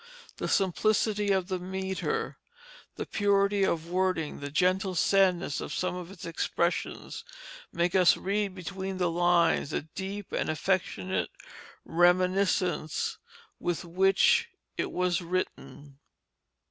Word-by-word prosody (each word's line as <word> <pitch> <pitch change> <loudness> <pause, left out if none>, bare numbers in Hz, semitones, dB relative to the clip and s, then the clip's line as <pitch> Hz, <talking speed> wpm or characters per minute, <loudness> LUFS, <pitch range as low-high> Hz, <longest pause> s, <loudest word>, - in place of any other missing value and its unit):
The - - -3
simplicity 210 +2 +1
of 190 -1 0
metre, 190 - -3 0.6
the - - -4
purity 200 -1 +2
of 165 -3 0
wording, 180 -4 0
the 145 - -5
gentle 185 +4 +1
sadness 180 -4 +2
of - - -6
some 180 - -1
of 180 -1 -6
its 195 - -10
expressions, 170 +1 -2 0.5
make 175 +1 0
us 185 -2 +5
read 200 0 -1
between 190 +1 -5
the 180 -2 +1
lines 175 -3 +3
the - - -2
deep 190 +5 -6
and - - -1
affectionate 185 +3 -1 0.6
reminiscence 180 -1 +2 0.4
with 175 +1 -2
which 190 - +3 0.3
it - - -2
was 180 0 0
written. 150 -5 -5
185 Hz, 115 wpm, -29 LUFS, 175-195 Hz, 0.6 s, us